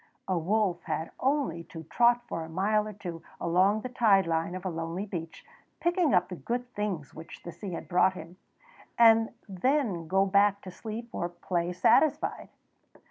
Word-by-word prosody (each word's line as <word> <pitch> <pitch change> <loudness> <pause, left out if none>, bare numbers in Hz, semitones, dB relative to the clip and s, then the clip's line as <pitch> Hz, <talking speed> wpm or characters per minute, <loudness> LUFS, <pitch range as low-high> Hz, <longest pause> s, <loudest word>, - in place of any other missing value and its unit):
A 185 - +1
wolf 185 +1 0
had 160 0 -3
only 265 - 0
to 160 0 -9
trot 240 +8 +3
for 165 - -4
a 160 - -9
mile 210 +5 +1
or 215 - -6
two 175 -5 -7 0.2
along 190 +5 +2
the 255 - -5
tide 215 -6 +4
line 165 +1 -1
of 185 0 -7
a - - 0
lonely 165 +4 -4
beach, 165 -5 -7 0.3
picking 345 -3 +2
up 180 - +3
the 180 - -5
good 245 +7 -3
things 190 -9 -3
which 160 +1 -11
the 170 - -7
sea 190 +1 -7
had - - -6
brought 180 +1 +3
him, 170 +1 -10 0.6
and 225 -1 +6 0.2
then 200 - 0
go 190 +3 +3
back 200 +1 +3
to 185 - -9
sleep 225 +4 -7
or 175 -6 -3
play 175 0 -2
satisfied. 230 - +2
190 Hz, 180 wpm, -29 LUFS, 170-220 Hz, 0.6 s, and